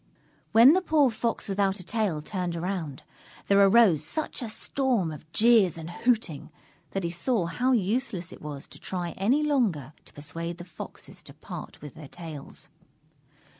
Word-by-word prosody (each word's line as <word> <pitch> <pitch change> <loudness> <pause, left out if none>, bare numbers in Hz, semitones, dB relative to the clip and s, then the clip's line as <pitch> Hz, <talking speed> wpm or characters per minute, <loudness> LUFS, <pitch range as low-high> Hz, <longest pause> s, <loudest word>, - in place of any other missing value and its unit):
When 235 +7 +8
the 375 - +3
poor 300 -7 +3
Fox 230 +1 -2
Without 195 0 0
a - - -8
Tail 190 -7 -1
turned 180 -2 -3
around, 170 -5 -4 0.4
there 200 0 +4
arose 195 -7 +5
such 310 - -3
a 235 - -4
storm 235 - 0
of 155 +1 -11
jeers 220 -6 +4
and 165 +1 -7
hooting, 215 - -1 0.4
that 195 - -3
he 170 - -1
saw 180 +3 0
how 245 +11 0
useless 210 -4 -1
it - - -13
was 145 -2 -7
to - - -13
try 175 -2 -4
any 240 - +1
longer 205 - 0
to - - -15
persuade 165 +3 -6
the 175 - -9
Foxes 170 -3 -10
to - - -14
part - - -9
with 150 - -8
their 155 -3 -11
tails. 160 -3 -9
190 Hz, 170 wpm, -27 LUFS, 165-235 Hz, 0.4 s, When